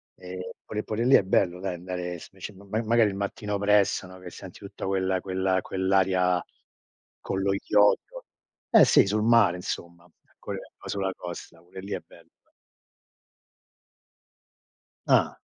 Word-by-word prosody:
Ehm, 90 0 -9 0.3
pure 105 0 -4
pure 115 +2 -2
lì 135 - +6
è - - +5
bello 90 -1 +1
dai 95 -1 -3
andare 90 0 -5
s - - -12
sc 95 - -7
ma 100 +1 -15 0.2
magari 115 -1 +3
il 95 - -5
mattino 100 +1 -3
presto, 100 -1 +2
no, 95 0 -13
che 90 -1 -9
senti 90 +1 -11
tutta 100 0 -8
quella 95 -1 0
quella 95 0 0
quell'area 95 -1 +1 0.8
con 95 - -3
lo 100 - +1
iodio. 105 - +2 0.4
Eh, - - +7
sì, - - +5
sul 105 +2 0
mare 115 -6 +5
insomma, 85 -1 -6 0.3
co - - -7 0.3
o - - -11
sulla 95 -1 -1
costa, 85 -1 -9
pure 90 +2 -11
lì 100 +2 -6
è - - -2
bello. - - -19 2.8
Ah. - - +3
95 Hz, 150 wpm, -26 LUFS, 90-100 Hz, 2.8 s, Eh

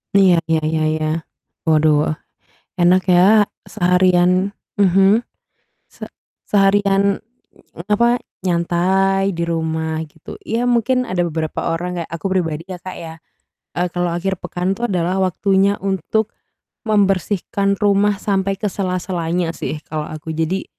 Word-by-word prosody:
Iya 190 -3 +6 0.2
iya 160 - +3
iya 160 0 0
iya. 155 0 -1 0.6
Waduh. 155 -1 +3 0.7
Enak 180 +1 +4
ya 195 +4 +5 0.2
seharian 180 +1 +2 0.2
mhm. 195 +3 +4 0.7
Se - - -9 0.4
seharian, 200 0 +3 0.7
apa, 235 +3 +4 0.4
nyantai 190 +2 +1
di 170 - -2
rumah, 160 -1 -2
gitu. 155 +1 -12
Ya 230 +2 0
mungkin 245 +1 +2
ada 185 -6 -4
beberapa 160 -1 -3 0.2
orang 180 +1 -4
kayak 165 - -6
aku 170 - -10
pribadi 165 -4 -1
ya 180 - -6
Kak 185 +1 -8
ya, 160 -1 -8 0.6
eee, 180 +1 +1
kalau 175 -1 0
akhir 190 0 -3
pekan 180 +2 -2
itu 235 - -9
adalah 185 0 0
waktunya 195 +2 +2
untuk 195 +3 -1 0.5
membersihkan 200 -1 +1
rumah 205 0 +2
sampai 195 -1 -1
ke 210 - -5
sela-selanya 180 -3 -2
sih 155 - -4
kalau 155 -1 -4
aku. 155 +1 -6
Jadi, 165 +4 -1
185 Hz, 125 wpm, -19 LUFS, 170-195 Hz, 0.7 s, Iya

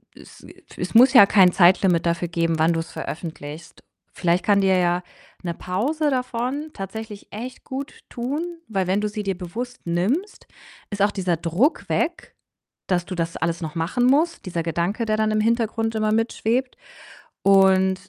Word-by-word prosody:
Äh, - - -16
es - - -16
wir - - -14 0.2
es - - -4
muss 255 +3 +7
ja 205 - +9
kein 190 -3 +5
Zeitlimit 175 -1 +4
dafür 170 +1 0
geben, 165 -1 -1
wann 165 +2 +3
du's 165 0 -4
veröffentlichst. 155 -1 -7 0.3
Vielleicht 175 0 +1
kann 205 -1 +3
dir 190 -1 +3
ja 175 0 +1 0.4
'ne 170 -1 -2
Pause 280 - -1
davon 255 +3 -2
tatsächlich 210 +1 -7
echt 245 +4 -8
gut 270 +1 -6 0.2
tun. 255 +6 -3 0.3
Weil, 190 -4 -1
wenn 190 +2 +1
du 210 - 0
sie 210 0 -5
dir 195 -2 -2
bewusst 230 +8 -6
nimmst, 215 - -1 0.4
ist 205 -1 -4
auch 205 +1 +4
dieser 180 -4 -1
Druck 175 - 0
weg, - - -2 0.5
dass 175 -2 0
du 185 - -6
das 165 0 -3
alles 170 +1 -2
noch 160 +1 -5
machen 180 +10 0
musst, 310 - +2
dieser 170 -2 -3
Gedanke, 170 +8 -1
der 215 0 +1
dann 215 0 +1
im 215 - +1
Hintergrund 225 0 0
immer 215 0 +1
mit 225 +1 +1
schwebt. 250 +4 -1 0.7
Und 190 -1 +5
195 Hz, 175 wpm, -23 LUFS, 175-235 Hz, 0.7 s, ja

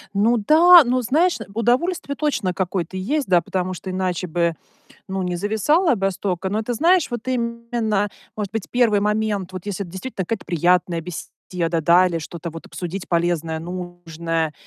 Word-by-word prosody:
Ну 225 +4 +3
да. 330 - +7
Ну, 250 +1 +1
знаешь, 320 +9 +2 0.2
удовольствие 280 - 0
точно 245 -11 -1
какое-то 185 -1 -2
есть, 270 +9 -1
да, 180 -2 +4
потому 185 +1 -2
что 185 +2 -7
иначе 185 -1 -2
бы, 170 0 0 0.5
ну, 190 0 -2
не 180 -1 -2
зависала 220 - +2
б 195 -1 +1
столько. 190 -1 -3
Но, 210 +3 -1
ты 245 - -3
знаешь, 335 +6 +3
вот 240 +1 -5
именно, 235 -4 -1 0.3
может 210 -3 -4
быть, 225 -3 -4
1 230 -4 +3
момент, 210 -3 -1
вот 185 0 -7
если 200 -1 -3
это 170 - -12
действительно 190 0 -5
какая-то 220 +3 -4
приятная 175 0 +2
беседа, 175 0 -7 0.5
да? 175 +4 +5
Или 170 -2 -2
что-то 165 +1 -7
вот 165 0 -10
обсудить 180 +1 -6
полезное, 170 -2 0
нужное, 170 -2 -4
190 Hz, 170 wpm, -21 LUFS, 175-235 Hz, 0.5 s, да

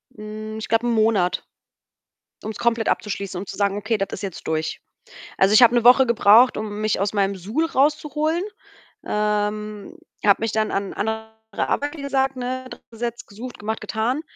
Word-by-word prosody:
Hm, 215 0 -7
ich - - -6
glaube, 230 +2 +1
1 - - +1
Monat, 215 -5 +2 1.0
ums 215 0 -5
komplett 230 -2 +1
abzuschließen, 200 -3 -2
um 195 - -7
zu - - -8
sagen: 200 -1 +1
„Okay, 220 +2 0
das 195 -1 -1
ist 195 - -5
jetzt 195 -4 -6
durch.“ 160 0 -2 0.6
Also, 195 +2 +4
ich 215 - +7
habe 240 0 +7
1 240 -1 +2
Woche 255 +2 +7
gebraucht, 235 +2 +5
um 210 -1 -4
mich 215 -2 0
aus 200 0 0
meinem 200 -1 0
Suhl 215 - -1
rauszuholen. 300 +3 +1 0.6
Ähm, 210 0 -2 0.3
habe 200 0 +5
mich 225 -1 0
dann 220 -1 0
an 195 0 -2
andere 220 +1 -3 0.2
Arbeit, 290 +8 -1
wie - - -7
gesagt, 270 -1 0
ne, 255 +1 -4
dran - - -10
gesetzt, 235 +1 -5
gesucht, 235 +4 -9
gemacht, 220 +2 -3
getan. 225 +6 -1
220 Hz, 180 wpm, -22 LUFS, 205-245 Hz, 1.0 s, ich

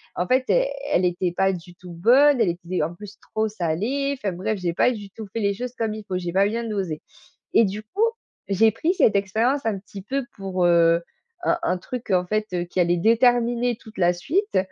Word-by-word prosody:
en 180 - -1
fait, 255 0 +2
e - - +4 0.3
elle 180 - +3
était 175 0 0
pas 195 0 +3
du 175 0 -9
tout 180 -1 -12
bonne. 250 +8 +5
Elle 195 - +3
était 175 -1 -2
en 165 +3 -3
plus 210 +2 -11
trop 220 0 0
salée. 220 - -1
Enfin 200 -6 -3
bref, 200 +3 -2
j'ai 175 -2 -1
pas 250 - +3
du 205 -4 -7
tout 220 - -8
fait 230 - -2
les 200 0 +1
choses 250 +2 -5
comme 225 -2 -2
il 215 - -8
faut. 185 - -2
J'ai 175 -1 -3
pas 195 +1 +4
bien 230 +2 -2
dosé 190 -8 -3 0.5
et 230 - +6
du 205 +2 -4
coup, 400 - -2 0.5
j'ai 220 +3 +4
pris 320 - 0
cette 210 - +3
expérience 225 +8 0
un 215 -3 0
petit 200 0 -10
peu 275 +5 -2
pour, 185 -2 -1
heu, 170 0 +4 0.4
un 345 - +1
un 185 - +1
truc 245 +6 -7
en 180 -1 +2
fait, 215 +2 -1
heu, 175 -1 0
qui 180 +1 -4
allait 175 0 +2
déterminer 240 +3 +3
toute 220 -3 -15
la 175 0 +4
suite 360 - -1
205 Hz, 225 wpm, -23 LUFS, 180-235 Hz, 0.5 s, et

